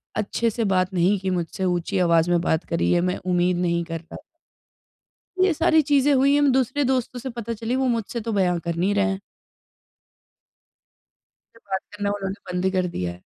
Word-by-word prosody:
अच्छे 215 +2 0
से 230 +1 -2
बात 190 -2 +1
नहीं 185 +3 +3
की 190 0 -2
मुझसे, 180 0 -3
ऊँची 180 +2 -1
आवाज़ 170 -1 +3
में 175 - +3
बात 160 -1 0
करी 170 - 0
है 175 - +3
मैं 180 +1 0
उम्मीद 180 0 +1
नहीं 170 -1 0
करता। 165 0 -7 1.3
ये 375 -2 +3
सारी 320 0 +3
चीज़ें 285 -1 +3
हुई 275 +1 +4
हैं 290 - +4
हम 285 -2 +4
दूसरे 260 +2 +1
दोस्तों 255 -1 -1
से 260 - -5
पता 235 -1 -5
चली 230 +2 -3
वो 265 0 +1
मुझसे 230 +1 -4
तो - - 0
बयाँ 180 -3 +1
कर 170 -1 -2
नहीं 185 +4 +1
रहे 200 0 +3
हैं। 195 -1 -1 2.4
मुझसे 230 - -22
बात 190 - +1
करना 205 0 -2
उन्होंने 195 0 -5
बंद 180 +1 -1
ही 190 - +2
कर 185 -1 0
दिया 90 -1 -2
है। 90 +1 -13
195 Hz, 200 wpm, -23 LUFS, 175-235 Hz, 2.4 s, हुई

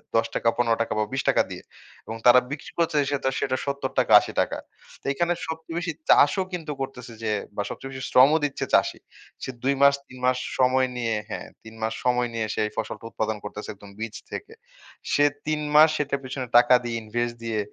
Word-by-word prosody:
৳১০ 115 - +4
টাকা, 115 - +2
৳১৫ 115 -2 +2
টাকা 115 - -1
বা - - +3
৳২০ 135 - 0
টাকা - - +4
দিয়ে। - - -7 0.4
এবং 110 +1 -5
তারা 125 +1 +9
বিক্রি 150 - -6
করছে 165 -2 +1 0.2
সেতা 135 -2 0
সেটা 130 -1 0
৳৭০-৳৮০ 140 0 +2 0.4
তো - - -35
এইখানে 170 +5 +1
সবচেয়ে 160 +1 -5
বেশি 175 -1 -2 0.2
চাষও 185 +7 +5
কিন্তু 160 -4 -4
করতেছে 125 -3 -6
যে 110 - 0 0.3
বা 100 - 0
সবচেয়ে 135 - -7
বেশি 130 -1 -7
শ্রমও 140 +5 +6
দিচ্ছে 140 - -3
চাষী। - - +3 0.4
সে - - -4
২ 140 +1 +3
মাস 140 0 +7
৩ 130 - -13
মাস 125 0 +3 0.2
সময় 130 0 +4
নিয়ে 115 -2 0
হ্যাঁ, - - -5 0.2
৩ 110 0 -12
মাস 110 0 -1
সময় 125 -1 +2
নিয়ে 115 -1 -1
সে - - -4
এই - - -10
ফসলটা 110 +1 -4
উৎপাদন 110 -1 -2
করতেছে, 105 0 -7
একদম 100 0 -14
বীজ 115 -1 -5 0.2
থেকে। 440 - -7 0.6
সে 145 - +5 0.2
৩ 155 -1 0
মাস 155 +1 +8
সেটার 140 -1 -1
পেছনে 130 0 -5
টাকা 120 +1 +6
দিয়ে 120 -1 -3
ইনভেস্ট 120 +2 -2
দিয়ে, 115 -2 -1
125 Hz, 195 wpm, -25 LUFS, 115-140 Hz, 0.6 s, তারা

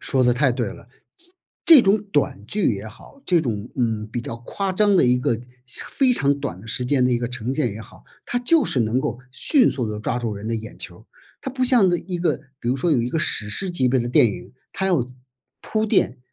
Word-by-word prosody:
说 130 - +1
得 125 - +4
太 130 +2 +2
对 - - -2
了， - - -12 0.8
这 330 - +10
这 260 - +7
种 200 0 +2
短 105 -8 0
剧 200 - +1
也 100 +2 -7
好， 125 - -14
这 175 -2 +3
种， 115 -5 -4
嗯， 110 -4 -1
比 120 - -3
较 115 -1 -6
夸 190 +11 -3
张 205 +1 +3
的 175 - +5
一 125 0 +3
个 120 -2 0 0.3
非 255 - 0
常 140 - +1
短 140 -10 -5
的 110 - -13
时 120 +3 -2
间 130 0 +2
的 125 - +2
一 120 - +2
个 120 - -3
呈 125 0 -4
现 135 -4 0
也 110 - -8
好， - - -15 0.2
它 245 - -1
就 290 +5 +3
是 125 - +1
能 115 +3 +1
够 135 -4 -3
迅 255 - +3
速 125 -5 -3
地 105 - -5
抓 120 +3 -2
住 115 -3 -3
人 100 +1 -8
的 115 - -1
眼 110 0 -7
球 - - -7
儿。 - - -19 0.4
它 265 - -5
不 255 0 -3
像 245 -6 +5
那 175 - +2
一 180 0 -5
个 175 - 0 0.2
比 120 - -4
如 130 - +1
说 155 +6 0
有 140 -6 +3
一 120 - -2
个 160 - -1
史 105 -8 +2
诗 185 - -1
级 135 -8 +1
别 130 0 +2
的 120 - -3
电 120 - +5
影， 105 - -6 0.2
它 190 - -1
要 155 -10 +1 0.5
铺 220 0 -1
垫， 165 - +1
130 Hz, 270 characters per minute, -22 LUFS, 115-190 Hz, 0.8 s, 这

